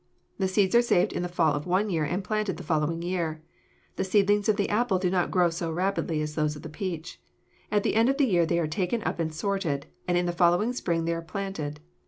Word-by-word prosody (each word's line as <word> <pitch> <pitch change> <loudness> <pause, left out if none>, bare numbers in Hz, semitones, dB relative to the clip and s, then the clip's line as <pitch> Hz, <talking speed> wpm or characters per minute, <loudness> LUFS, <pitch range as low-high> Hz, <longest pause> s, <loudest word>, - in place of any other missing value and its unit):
The 190 - +2
seeds 190 0 +2
are 235 - +7
saved 235 -7 +2
in - - -2
the 180 - -3
fall 165 -4 +2
of 145 +3 -3
one 195 +3 +1
year 160 -3 +1
and 180 +6 -2
planted 215 0 -1
the 180 - -8
following 160 +1 0
year. 170 -3 -2 0.5
The - - 0
seedlings 205 +2 +2
of 215 - +4
the 200 -1 0
apple 215 -2 +1
do 180 -1 0
not 180 -2 +1
grow 175 -2 +3
so 165 0 -3
rapidly 175 -3 -1
as 150 0 -4
those 150 -1 0
of 150 - -10
the 160 - -7
peach. 170 +1 -5 0.5
At 205 -1 +2
the - - +1
end 225 +3 +4
of 275 - +1
the 285 - +4
year 175 -8 +2
they 170 - +1
are 170 - +1
taken 185 +7 -1
up - - -2
and 160 -1 -1
sorted, 165 -4 -2 0.2
and 175 -1 +2
in 175 - +1
the 175 - 0
following 175 +7 +3
spring 170 -9 -1
they 170 - 0
are 165 - -3
planted. 165 -5 -5
180 Hz, 250 wpm, -27 LUFS, 165-200 Hz, 0.5 s, are